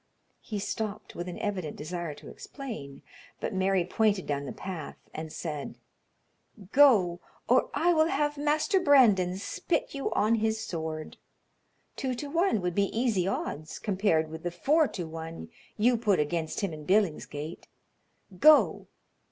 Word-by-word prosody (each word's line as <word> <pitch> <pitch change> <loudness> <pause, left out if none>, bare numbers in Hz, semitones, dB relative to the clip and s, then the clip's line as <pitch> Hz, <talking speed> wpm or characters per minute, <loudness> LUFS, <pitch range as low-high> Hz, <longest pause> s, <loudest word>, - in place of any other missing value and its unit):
He 215 - -5
stopped, 210 +1 -4
with 175 +1 -5
an 180 - -6
evident 185 -7 -3
desire 165 0 -5
to - - -13
explain, 215 - -8 0.4
but - - -3
Mary 190 -1 +2
pointed 205 0 +1
down 140 -1 -2
the - - -5
path 180 -6 -7 0.2
and 160 0 -6
said: 150 -4 -5 1.0
"Go, 210 -12 +5 0.3
or - - +3
I 350 +1 +3
will 315 -1 +4
have 295 -1 0
Master 305 +6 +2
Brandon 215 - +5
spit 310 - -2
you 275 -1 -3
on 215 +2 +2
his 220 0 +1
sword. 160 -6 -5 0.8
Two 260 -2 -2
to 285 +3 -6
one 335 - +2
would 180 -1 -1
be 200 +2 +1
easy 215 -8 +1
odds 155 -5 -3
compared 185 -6 +1
with 160 0 -7
the 175 - -2
four 290 - +2
to 175 - -5
one 165 +4 -7 0.3
you 235 +3 +3
put 210 -4 +2
against 160 +3 -1
him 195 -5 -2
in 155 -1 -8
Billingsgate. 160 -4 -1 0.7
Go!" 305 0 +6
195 Hz, 150 wpm, -28 LUFS, 165-245 Hz, 1.0 s, Go